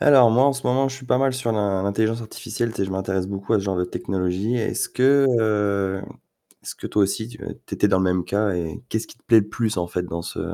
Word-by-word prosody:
Alors 130 Hz, -5 st, +7 dB
moi 125 Hz, +4 st, +5 dB
en 140 Hz, -, +4 dB
ce 135 Hz, -, -6 dB
moment, 135 Hz, +2 st, +2 dB
je 135 Hz, -, -7 dB
suis 130 Hz, -1 st, -11 dB
pas 125 Hz, -, +2 dB
mal 135 Hz, 0 st, +2 dB
sur 130 Hz, -3 st, -1 dB
l'in 100 Hz, -3 st, 0 dB
l'intelligence 110 Hz, +3 st, 0 dB
artificielle, 115 Hz, +1 st, -4 dB
tu -, -, -11 dB
sais, 100 Hz, -, 0 dB
je 95 Hz, -, -5 dB
m'intéresse 95 Hz, -1 st, -2 dB
beaucoup 100 Hz, +2 st, -3 dB
à 110 Hz, -, +4 dB
ce -, -, -5 dB
genre 95 Hz, -2 st, -1 dB
de 90 Hz, -, +1 dB
technologie. 95 Hz, +5 st, -2 dB
Est-ce 115 Hz, -, -1 dB
que, 135 Hz, +2 st, +4 dB
heu, 100 Hz, -3 st, 0 dB, 0.6 s
est-ce -, -, -7 dB
que -, -, -7 dB
toi 105 Hz, -, +2 dB
aussi 110 Hz, +3 st, -1 dB
tu 120 Hz, -, -12 dB, 0.3 s
tu -, -, -5 dB
étais 105 Hz, -, +3 dB
dans 95 Hz, -, +3 dB
le 95 Hz, -, +1 dB
même 90 Hz, -1 st, +1 dB
cas 105 Hz, +1 st, 0 dB
et 85 Hz, -3 st, -4 dB
qu'est-ce 110 Hz, 0 st, -2 dB
qui -, -, -15 dB
te -, -, -35 dB
plaît 115 Hz, -3 st, +6 dB
le 100 Hz, -, -7 dB
plus, 110 Hz, -2 st, -1 dB
en 85 Hz, -1 st, -1 dB
fait, 90 Hz, +1 st, -2 dB
dans 85 Hz, -1 st, -5 dB
ce -, -, -6 dB
105 Hz, 275 wpm, -23 LUFS, 95-120 Hz, 0.6 s, Alors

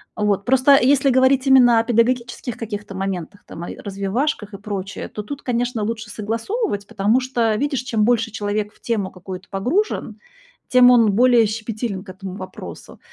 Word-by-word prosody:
Вот. 205 Hz, -2 st, 0 dB
Просто 260 Hz, +2 st, +4 dB
если 270 Hz, +1 st, +4 dB
говорить 260 Hz, +1 st, +3 dB
именно 245 Hz, -3 st, +6 dB
о -, -, +1 dB
педагогических 240 Hz, +1 st, 0 dB
каких-то 210 Hz, -3 st, -6 dB
моментах, 190 Hz, 0 st, -5 dB
там, 170 Hz, -, -9 dB
ай -, -, -6 dB
развивашках 205 Hz, +3 st, -3 dB
и -, -, -6 dB
прочее, 200 Hz, -1 st, -5 dB
то 210 Hz, -, -6 dB
тут, 285 Hz, +6 st, -7 dB
конечно, 240 Hz, -2 st, -1 dB
лучше 220 Hz, 0 st, -4 dB
согласовывать, 225 Hz, -, -3 dB
потому 220 Hz, +2 st, +1 dB
что, 240 Hz, -4 st, 0 dB
видишь, 275 Hz, +2 st, -1 dB
чем 225 Hz, -4 st, 0 dB
больше 230 Hz, -1 st, +1 dB
человек 210 Hz, 0 st, -3 dB
в -, -, -27 dB
тему 210 Hz, -5 st, -2 dB
какую-то 185 Hz, +1 st, -9 dB
погружен, 255 Hz, -, -1 dB, 0.5 s
тем 250 Hz, -1 st, +7 dB
он 230 Hz, -4 st, +5 dB
более 240 Hz, +1 st, +5 dB
щепетилен 215 Hz, -2 st, -4 dB
к 200 Hz, -, -14 dB
этому 190 Hz, 0 st, -8 dB
вопросу. 185 Hz, -, -10 dB
225 Hz, 165 wpm, -21 LUFS, 200-250 Hz, 0.5 s, тем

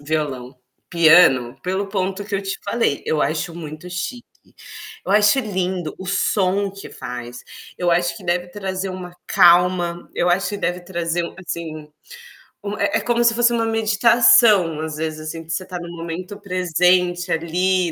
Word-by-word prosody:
violão. 140 Hz, -4 st, -3 dB, 0.3 s
Piano, 155 Hz, -7 st, +5 dB
pelo 190 Hz, +2 st, -2 dB
ponto 195 Hz, 0 st, -2 dB
que 205 Hz, -1 st, -5 dB
eu 195 Hz, -, -1 dB
te 195 Hz, 0 st, -4 dB
falei, 200 Hz, -8 st, 0 dB
eu 155 Hz, -1 st, +1 dB
acho 160 Hz, +2 st, -2 dB
muito 155 Hz, 0 st, -8 dB
chique. 235 Hz, +8 st, -5 dB, 0.8 s
Eu -, -, -3 dB
acho 210 Hz, +4 st, +5 dB
lindo 185 Hz, -5 st, -3 dB
o 190 Hz, -, -8 dB
som 195 Hz, 0 st, 0 dB
que 195 Hz, +1 st, -11 dB
faz. 125 Hz, 0 st, -8 dB, 0.4 s
Eu 175 Hz, -1 st, +1 dB
acho 175 Hz, 0 st, +1 dB
que 195 Hz, -, -12 dB
deve 180 Hz, 0 st, -1 dB
trazer 190 Hz, 0 st, -4 dB
uma 180 Hz, -1 st, -8 dB
calma. 175 Hz, 0 st, +3 dB
Eu 175 Hz, -, +1 dB
acho 180 Hz, +1 st, +1 dB
que 205 Hz, -, -4 dB
deve 180 Hz, -2 st, -2 dB
trazer 175 Hz, -1 st, -2 dB
uma, -, -, -9 dB
assim, 155 Hz, -2 st, -6 dB, 0.8 s
uma 205 Hz, 0 st, -5 dB
é 200 Hz, -, +2 dB
é -, -, -5 dB
como 240 Hz, 0 st, +1 dB
se 235 Hz, -1 st, +4 dB
fosse 240 Hz, 0 st, +4 dB
uma 230 Hz, -1 st, 0 dB
meditação, 220 Hz, -5 st, +4 dB
às 160 Hz, -1 st, -4 dB
vezes, 155 Hz, 0 st, -4 dB
assim, 165 Hz, +1 st, -6 dB
que 160 Hz, -, -23 dB
você 185 Hz, -, -2 dB
está 180 Hz, -1 st, -7 dB
no 170 Hz, -, -8 dB
momento 175 Hz, +4 st, -6 dB
presente 180 Hz, -1 st, +1 dB
ali, 175 Hz, +2 st, 0 dB
180 Hz, 170 wpm, -20 LUFS, 165-195 Hz, 0.8 s, Piano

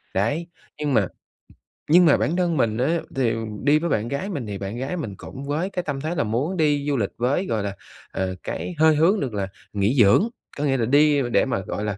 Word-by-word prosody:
Đấy, 145 Hz, -, 0 dB, 0.3 s
nhưng 150 Hz, -2 st, -1 dB
mà 105 Hz, -6 st, +3 dB, 0.8 s
nhưng 175 Hz, +2 st, +7 dB
mà 150 Hz, -, +5 dB
bản 165 Hz, -, 0 dB
thân 175 Hz, -4 st, +1 dB
mình 110 Hz, -3 st, +1 dB
á, 155 Hz, +8 st, +1 dB, 0.2 s
thì 125 Hz, -4 st, +1 dB, 0.3 s
đi 145 Hz, +2 st, +4 dB
với 170 Hz, +1 st, -2 dB
bạn 110 Hz, -2 st, 0 dB
gái 140 Hz, +10 st, -3 dB
mình 140 Hz, -, -4 dB
thì 100 Hz, -1 st, -4 dB
bạn 100 Hz, +3 st, -5 dB
gái 135 Hz, +8 st, -3 dB
mình 110 Hz, -, -5 dB
cũng 135 Hz, -, -9 dB
với 155 Hz, +6 st, -1 dB
cái 180 Hz, -2 st, -3 dB
tâm 145 Hz, -4 st, -3 dB
thế 160 Hz, +4 st, -2 dB
là -, -, +1 dB
muốn 130 Hz, -, -1 dB
đi 145 Hz, -3 st, +2 dB
du 145 Hz, -2 st, +1 dB
lịch 100 Hz, -4 st, -1 dB
với, 130 Hz, +10 st, 0 dB
gọi 110 Hz, -3 st, -1 dB
là, 100 Hz, -1 st, -4 dB, 0.4 s
ờ, 95 Hz, -1 st, -2 dB
cái 180 Hz, -, -4 dB
hơi 160 Hz, 0 st, +5 dB
hướng 170 Hz, +8 st, +3 dB
được 130 Hz, -, -3 dB
là 100 Hz, -2 st, -2 dB, 0.3 s
nghỉ 105 Hz, +6 st, +1 dB
dưỡng. 110 Hz, -, +5 dB, 0.3 s
Có 145 Hz, -, -2 dB
nghĩa 135 Hz, -2 st, +2 dB
là 115 Hz, -, +1 dB
đi 145 Hz, +3 st, +4 dB
để -, -, +3 dB
mà, 125 Hz, -7 st, -1 dB
gọi 100 Hz, +2 st, -4 dB
là, 105 Hz, -1 st, -2 dB
140 Hz, 240 wpm, -23 LUFS, 110-160 Hz, 0.8 s, nhưng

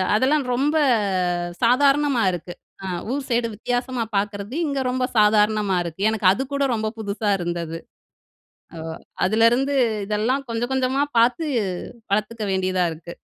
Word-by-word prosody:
அதெல்லாம் 270 Hz, +5 st, +2 dB
ரொம்ப 285 Hz, +5 st, +1 dB, 0.9 s
சாதாரணமா 275 Hz, +1 st, +3 dB
இருக்கு. 175 Hz, 0 st, -6 dB, 0.3 s
அ 190 Hz, -, -4 dB, 0.3 s
ஊர் 280 Hz, 0 st, -2 dB
சைடு 235 Hz, -1 st, +1 dB
வித்தியாசமா 245 Hz, +2 st, -2 dB
பார்க்கறது, 205 Hz, +3 st, -3 dB
இங்க 280 Hz, -1 st, -1 dB
ரொம்ப 255 Hz, 0 st, 0 dB
சாதாரணமா 210 Hz, -2 st, +3 dB
இருக்கு. 170 Hz, +3 st, -7 dB
எனக்கு 215 Hz, -4 st, +1 dB
அதுக்கூட 275 Hz, +5 st, -2 dB
ரொம்ப 220 Hz, -1 st, -1 dB
புதுசா 205 Hz, 0 st, -1 dB
இருந்தது. 170 Hz, -1 st, -3 dB, 1.0 s
ஓ! -, -, -7 dB, 0.5 s
அதுலேருந்து, 230 Hz, +7 st, +3 dB, 0.3 s
இதெல்லாம் 220 Hz, +7 st, 0 dB
கொஞ்சம், 235 Hz, +2 st, -2 dB
கொஞ்சமா 265 Hz, +1 st, +1 dB, 0.2 s
பார்த்து 245 Hz, +8 st, +3 dB, 0.7 s
வளர்த்துக்க 215 Hz, +2 st, -1 dB
வேண்டியதா 185 Hz, -1 st, +1 dB
இருக்கு. 170 Hz, +2 st, -10 dB
230 Hz, 120 wpm, -22 LUFS, 200-260 Hz, 1.0 s, சாதாரணமா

